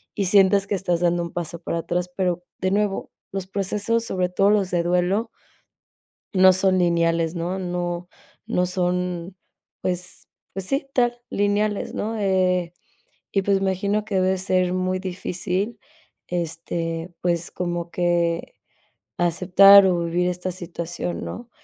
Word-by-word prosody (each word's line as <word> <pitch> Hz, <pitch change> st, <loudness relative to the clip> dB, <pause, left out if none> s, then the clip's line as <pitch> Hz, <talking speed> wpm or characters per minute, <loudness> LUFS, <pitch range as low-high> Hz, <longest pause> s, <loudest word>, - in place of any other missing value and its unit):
y 200 Hz, -, 0 dB
sientas 195 Hz, +1 st, +4 dB
que 205 Hz, -, 0 dB
estás 180 Hz, -3 st, 0 dB
dando 175 Hz, 0 st, +2 dB
un 170 Hz, -, -6 dB
paso 170 Hz, -1 st, -4 dB
para 170 Hz, -, -3 dB
atrás, 175 Hz, +2 st, -2 dB
pero, 180 Hz, -2 st, 0 dB, 0.2 s
de 185 Hz, 0 st, 0 dB
nuevo, 205 Hz, 0 st, 0 dB, 0.2 s
los 195 Hz, -1 st, -4 dB
procesos, 205 Hz, +4 st, -1 dB
sobre 185 Hz, -4 st, 0 dB
todo 195 Hz, +2 st, +3 dB
los 200 Hz, -3 st, +2 dB
de 175 Hz, -1 st, +1 dB
duelo 180 Hz, +6 st, +1 dB, 1.1 s
no 185 Hz, -1 st, +7 dB
son 185 Hz, 0 st, +3 dB
lineales, 170 Hz, -1 st, +1 dB
¿no? 175 Hz, +3 st, -2 dB
No, 175 Hz, -1 st, -3 dB, 0.4 s
no 180 Hz, -, +1 dB
son. 180 Hz, 0 st, -2 dB, 0.5 s
Pues 180 Hz, -1 st, -4 dB, 0.3 s
pues 195 Hz, 0 st, -4 dB
sí, 275 Hz, +7 st, -1 dB
tal 240 Hz, -1 st, +1 dB
lineales, 205 Hz, 0 st, 0 dB
¿no?, 220 Hz, +2 st, -3 dB
eh, 185 Hz, -3 st, +1 dB, 0.6 s
y 195 Hz, -, +2 dB
pues 195 Hz, 0 st, +2 dB
me 195 Hz, 0 st, +1 dB
imagino 200 Hz, +3 st, -1 dB
que 210 Hz, -2 st, -3 dB
debe 185 Hz, 0 st, +2 dB
ser 185 Hz, -1 st, +1 dB
muy 185 Hz, 0 st, 0 dB
difícil, 185 Hz, +3 st, -3 dB, 0.5 s
este, 165 Hz, 0 st, -3 dB
pues 175 Hz, -1 st, -1 dB
como 175 Hz, -1 st, -3 dB
que 170 Hz, -1 st, 0 dB, 0.6 s
aceptar 185 Hz, +3 st, +7 dB
o 175 Hz, -2 st, +1 dB
vivir 175 Hz, +2 st, 0 dB
esta 180 Hz, +1 st, -3 dB
situación, 175 Hz, -1 st, -5 dB
¿no?, 240 Hz, +1 st, -7 dB
180 Hz, 145 wpm, -23 LUFS, 175-195 Hz, 1.1 s, no